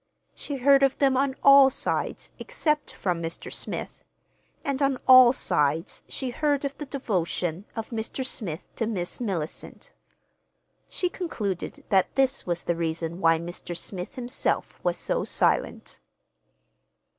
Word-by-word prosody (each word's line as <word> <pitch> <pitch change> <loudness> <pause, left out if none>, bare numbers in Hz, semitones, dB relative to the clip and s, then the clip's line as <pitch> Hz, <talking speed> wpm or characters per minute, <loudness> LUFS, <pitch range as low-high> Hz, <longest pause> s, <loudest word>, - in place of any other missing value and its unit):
She 285 - -5
heard 275 +1 +5
of 270 -1 +3
them 270 -2 +3
on 265 0 +1
all 275 -1 +8
sides, - - -3
except 300 -1 -1
from 175 -3 -2
Mr. 165 0 -6
Smith—and 280 0 -7
on 275 -1 +2
all 255 -2 +9
sides 155 - 0
she 260 -2 -4
heard 290 +1 0
of 280 0 -3
the 295 - -6
devotion 185 - -2
of 225 0 -5
Mr. 225 +3 -3
Smith 185 -9 -3
to 225 - -1
Miss 180 -6 -2
Mellicent. 195 - -5 1.0
She 360 - -1
concluded 215 - -4
that 190 -2 +2
this 270 -4 +1
was 175 -1 -1
the 170 - 0
reason 165 +1 -3
why 165 0 +5
Mr. 175 +1 -6
Smith 180 +1 -7
himself 250 0 -2
was - - 0
so - - -1
silent. - - 0
235 Hz, 135 wpm, -26 LUFS, 175-275 Hz, 1.0 s, all